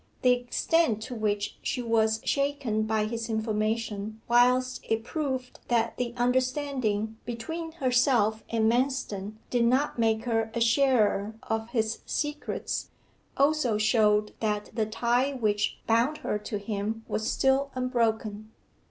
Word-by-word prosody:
The 250 - +6
extent 245 +1 +1
to 250 - -6
which 210 -2 -2
she 255 - -2
was 220 -2 +1
shaken 275 -7 0
by 215 -1 +1
his 230 +1 -4
information, 220 -1 -2
whilst 250 +2 +3
it 225 0 +1
proved 260 -3 -3
that 230 -1 +1
the 240 -1 -3
understanding 250 -4 0
between 320 +8 -5
herself 250 -6 +2
and 225 -1 0
Manston 230 -5 0 0.2
did 245 -2 +2
not 255 +3 +2
make 225 -1 +2
her 225 -2 0
a - - 0
sharer 230 -4 +3
of 225 +1 -2
his 225 -2 -1
secrets, 295 0 -3 0.5
also 280 -6 +2
showed 210 -1 +3
that 210 -1 -2
the 220 -1 0
tie 245 +5 +1
which 210 -5 0
bound 235 +7 +2
her 210 - 0
to 210 0 -4
him 215 +2 -3
was 215 - -1
still 270 +1 +2
unbroken. 220 -4 -1
230 Hz, 135 wpm, -28 LUFS, 215-255 Hz, 0.5 s, The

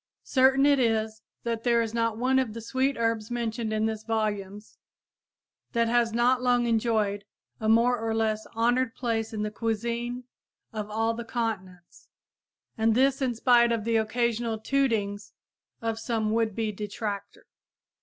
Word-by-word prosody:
Certain 265 +1 +4
it 285 -1 +4
is 220 -2 0 0.2
that 230 -1 -2
there 235 -1 +3
is 225 -1 -1
not 230 -1 0
one 260 +2 +2
of 245 -5 -1
the - - -4
sweet 260 +4 0
herbs 230 -2 -1
mentioned 235 -2 -2
in 215 0 0
this 220 -1 -3
volumes 210 -2 -3 0.9
that 230 0 +2
has 235 0 +2
not 245 +2 +2
long 245 -1 +2
enjoyed 220 -3 +1 0.4
a 220 - 0
more 235 +2 +4
or 225 0 -2
less 220 -1 0
honored 240 +2 +1
place 225 -3 -2
in 215 -1 -3
the 210 - -3
cuisine 235 +3 -2 0.5
of 215 -1 -4
all 225 +2 0
the 235 +1 -5
continents, 190 -7 -5 0.7
and 220 0 +3
this 270 +2 +3
in 250 -3 0
spite 235 0 +4
of 230 -2 0
the 230 +1 0
occasional 230 0 0
tootings 220 -5 -1 0.5
of 225 -1 -1
some 225 -2 -1
would 225 -2 0
be 220 -2 -1
detractor. 205 0 -5
230 Hz, 155 wpm, -27 LUFS, 220-240 Hz, 0.9 s, Certain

